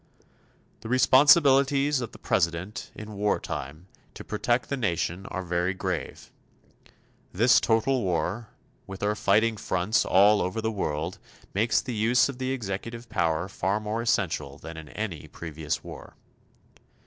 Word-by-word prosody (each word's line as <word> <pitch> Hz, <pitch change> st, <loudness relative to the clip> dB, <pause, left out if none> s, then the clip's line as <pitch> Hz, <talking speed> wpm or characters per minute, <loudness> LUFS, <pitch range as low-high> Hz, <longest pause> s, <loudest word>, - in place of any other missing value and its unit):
The 110 Hz, -, -9 dB
responsibilities 140 Hz, +1 st, +5 dB
of 120 Hz, -, -5 dB
the -, -, -13 dB
President 85 Hz, +5 st, -1 dB
in 110 Hz, 0 st, -8 dB
wartime 80 Hz, -7 st, -3 dB, 0.3 s
to -, -, -8 dB
protect 120 Hz, +3 st, -1 dB
the 140 Hz, -, -2 dB
nation 95 Hz, -5 st, -2 dB
are 95 Hz, -, -4 dB
very 90 Hz, +1 st, -1 dB
grave. 95 Hz, -3 st, -4 dB, 1.0 s
This 120 Hz, +6 st, +5 dB
total 120 Hz, +3 st, +1 dB
war, 95 Hz, +4 st, -2 dB, 0.4 s
with 95 Hz, 0 st, -8 dB
our 105 Hz, +1 st, +2 dB
fighting 110 Hz, +2 st, +2 dB
fronts 95 Hz, +3 st, 0 dB
all 100 Hz, +3 st, +5 dB
over 90 Hz, +5 st, -2 dB
the 110 Hz, 0 st, -1 dB
world, 80 Hz, -4 st, -3 dB, 0.3 s
makes 110 Hz, +3 st, +2 dB
the 125 Hz, -, -5 dB
use 120 Hz, +4 st, +3 dB
of 135 Hz, -2 st, -7 dB
the 130 Hz, 0 st, -2 dB
executive 115 Hz, 0 st, -5 dB
power 85 Hz, -4 st, 0 dB
far 95 Hz, +2 st, -1 dB
more 110 Hz, +2 st, -3 dB
essential 105 Hz, -7 st, -1 dB
than 80 Hz, -, -9 dB
in 80 Hz, -2 st, -10 dB
any 95 Hz, -9 st, -5 dB
previous 80 Hz, -2 st, -5 dB
war. -, -, -11 dB
105 Hz, 140 wpm, -26 LUFS, 90-120 Hz, 1.0 s, responsibilities